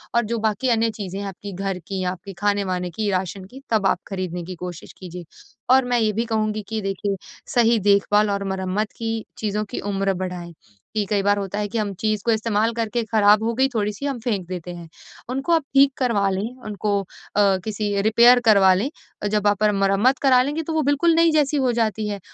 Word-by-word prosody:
और 235 - +4
जो 230 +2 -2
बाकी 230 +4 0
अन्य 230 -1 +2
चीज़ें 195 -3 -6
हैं, 200 - -4
आपकी 200 +1 -8
घर 195 0 -3
की, 190 -1 -3
आपके 185 +2 -5
खाने-वाने 195 -3 0
की 210 +4 -2
राशन 185 +1 -2
की, 265 +2 -11
तब 210 -3 +3
आप - - +1
खरीदने 185 -3 -4
की 185 - -7
कोशिश 175 -2 -8
कीजिए। 180 -1 -9 0.5
और 265 -1 +3
मैं 245 -1 +1
ये 215 -1 +2
भी 230 +3 -1
कहूँगी 215 -1 -1
कि 220 -1 -2
देखिए 195 +1 -2 0.4
सही 235 -1 +4
देखभाल 205 +1 +3
और 200 0 -1
मरम्मत 190 +3 -2
की 225 -1 -2 0.2
चीज़ों 210 -1 -1
की - - -3
उम्र 195 0 0
बढ़ाएँ 180 -2 -5 0.4
कि 210 - +1
कई 205 -2 +2
बार 205 0 +3
होता 200 +1 -3
है 210 - -1
कि 230 - -3
हम 210 -2 -1
चीज़ 215 -2 0
को 235 - +3
इस्तेमाल 220 0 +1
करके 230 +1 -1
खराब 210 0 +5
हो 230 +1 0
गई 265 +2 +3
थोड़ी-सी 210 +4 -2
हम 275 -3 -2
फेंक 205 -7 -2
देते 180 -1 -6
हैं। 170 -1 -10 0.4
उनको 270 +6 -2
आप 325 -2 +3
ठीक 275 0 +6
करवा 220 -6 +1
लें, 200 +6 -3
उनको 205 -1 -1
अ, 195 0 0
किसी 205 -2 -1
रिपेयर 235 +4 +6
करवा 195 -4 +6
लें, 210 +9 0 0.4
जब 210 0 +1
आप 205 0 +2
मर 210 - +4
मरम्मत 195 +6 +2
करा 255 -2 +6
लेंगे 295 +4 -2
तो 320 +1 -4
वो 315 - +2
बिल्कुल 330 +4 +3
नई 330 0 +4
जैसी 295 -1 +2
हो 260 -2 +2
जाती 220 -2 0
है, 205 -1 -4
210 Hz, 215 wpm, -22 LUFS, 195-230 Hz, 0.5 s, ठीक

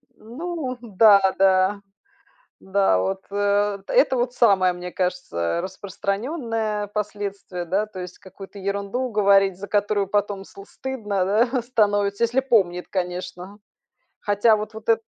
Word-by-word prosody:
Ну 265 +2 -5
да, 210 -2 +5 0.2
да. 190 +1 +3 0.8
Да, 190 - +2
от, 190 - -2
э 205 0 +1
это - - +3
вот 245 0 -1
самое, 195 -7 +4
мне 180 0 -7
кажется, 180 - -3
э, 85 - 0
распространенное 210 - -3
последствие, 200 -3 -4
да, 195 +5 0
то 195 -3 -9
есть 180 0 -8
какую-то 195 +1 -12
ерунду 200 +6 -3
говорить, 195 -2 +3
за 200 +2 -8
которую 205 -1 0
потом 205 -1 -1
сл 195 0 -13
стыдно, 210 -7 -3
да, 235 +5 +1
становится, 205 -3 +1
если 245 +3 +1
помнит, 190 -9 +1
конечно. 180 +1 -5 0.6
Хотя 205 +2 +3
вот 215 +1 -6
вот 220 0 -11
эт 225 - +3
200 Hz, 135 wpm, -23 LUFS, 190-220 Hz, 0.8 s, да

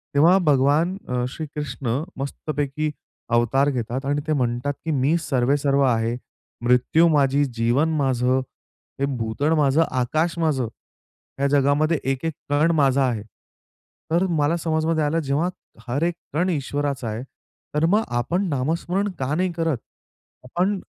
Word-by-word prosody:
तेव्हा 170 +6 +6
भगवान 145 +7 +2
अ, 125 0 -1
श्रीकृष्ण 145 -4 -4 0.2
मस्तपैकी 145 +1 -3 0.4
अवतार 130 +4 +3
घेतात 125 +1 -3
आणि 145 +1 0
ते 155 - +2
म्हणतात, 125 +1 0
की 160 - 0
"मी 145 +4 +2
सर्वे 135 0 +1
सर्व 140 -1 +1
आहे, 115 -2 +1 0.5
मृत्यू 125 +7 +4
माझी, 145 -2 +3
जीवन 120 +5 +1
माझं, 130 -2 +2 0.6
हे 140 - +2
भूतळ 115 +8 0
माझं, 150 +1 +3
आकाश 155 +7 0
माझं, 145 -7 +1 0.7
ह्या 140 - +2
जगामध्ये 145 +3 +2
एक-एक 150 +4 -2 0.2
कण 150 +4 +3
माझा 140 -2 +3
आहे." 110 -3 -3 0.9
तर 175 +3 +3
मला 145 +4 +2
समजमध्ये 160 -1 0
आलं, 150 +3 +1
जेव्हा 145 +6 0 0.4
हर 140 +6 -1
एक 175 +1 +1 0.2
कण 175 +4 +1
ईश्वराचा 145 -4 -2
आहे. 110 +4 -4 0.5
तर 150 +2 +3
मग 205 +6 +3 0.2
आपण 180 +10 0
नामस्मरण 170 +8 -1
का 135 +2 -1
नाही 180 +1 0
करत? 165 -5 0 0.7
आपण 185 +9 0
145 Hz, 140 wpm, -23 LUFS, 130-160 Hz, 0.9 s, तेव्हा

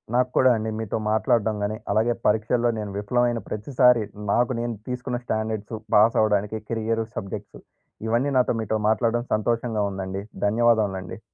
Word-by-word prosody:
నాకు 125 0 +3
కూడా 130 - +6
అండి 110 0 -3
మీతో 110 -1 -2
మాట్లాడడం 110 0 +2
గాని 105 +1 -2
అలాగే 110 +4 +2
పరీక్షల్లో 115 +3 +2
నేను 105 -2 -5
విఫలమైన 120 +3 +1
ప్రతిసారి 125 +2 +3 0.3
నాకు 120 +3 +2
నేను 120 0 -2
తీసుకున్న 125 0 -3
స్టాండర్డ్సు 110 0 -3 0.2
పాస్ 110 +2 +5
అవ్వడానికి 105 0 +1
కెరియర్ 115 0 -1
సబ్జెక్టు 100 +1 -6 0.5
ఇవన్నీ 120 +5 +1
నాతో 125 - +3
మీతో 110 0 -1
మాట్లాడడం 115 +1 +1
సంతోషంగా 110 0 0
ఉందండి. 95 0 -5 0.2
ధన్యవాదములండి. 105 -4 +1
110 Hz, 140 wpm, -24 LUFS, 105-120 Hz, 0.5 s, కూడా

